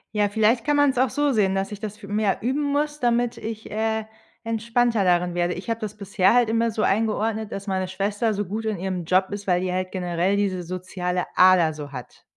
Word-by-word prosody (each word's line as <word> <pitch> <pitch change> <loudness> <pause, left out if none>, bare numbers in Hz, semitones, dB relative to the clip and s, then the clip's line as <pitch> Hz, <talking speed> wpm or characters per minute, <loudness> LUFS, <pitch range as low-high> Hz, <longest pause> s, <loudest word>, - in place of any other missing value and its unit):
Ja, 205 -1 +2
vielleicht 220 +3 +2
kann 295 0 +2
man's 285 -3 +3
auch 255 +1 +3
so 290 -1 +1
sehen, 200 -4 +2
dass 195 +1 -2
ich 205 - -7
das 210 -1 -5
fü 205 -1 -12
mehr 205 -1 0
üben 265 +6 0
muss, 295 +1 -1
damit 240 0 +1
ich, 220 0 -6
äh, 220 0 -1 0.4
entspannter 230 0 +1
darin 175 -1 +2
werde. 175 0 +1
Ich 180 +6 -8
habe 230 0 -2
das 215 -1 -5
bisher 195 -1 +2
halt 245 -2 +4
immer 230 0 +1
so 215 - -2
eingeordnet, 220 +1 0
dass 195 +1 -6
meine 190 -1 -1
Schwester 205 +4 -1
so 205 0 -2
gut 215 +5 -4
in 215 -2 -2
ihrem 185 -1 -3
Job 185 +3 +2
ist, 205 0 -5
weil 180 -2 +2
die 180 0 -2
halt 185 0 -2
generell 180 +1 0
diese 190 -3 -1
soziale 180 0 -3
Ader 180 -4 +5
so 145 -2 -8
hat. 125 -2 -10
205 Hz, 225 wpm, -24 LUFS, 185-225 Hz, 0.4 s, Ader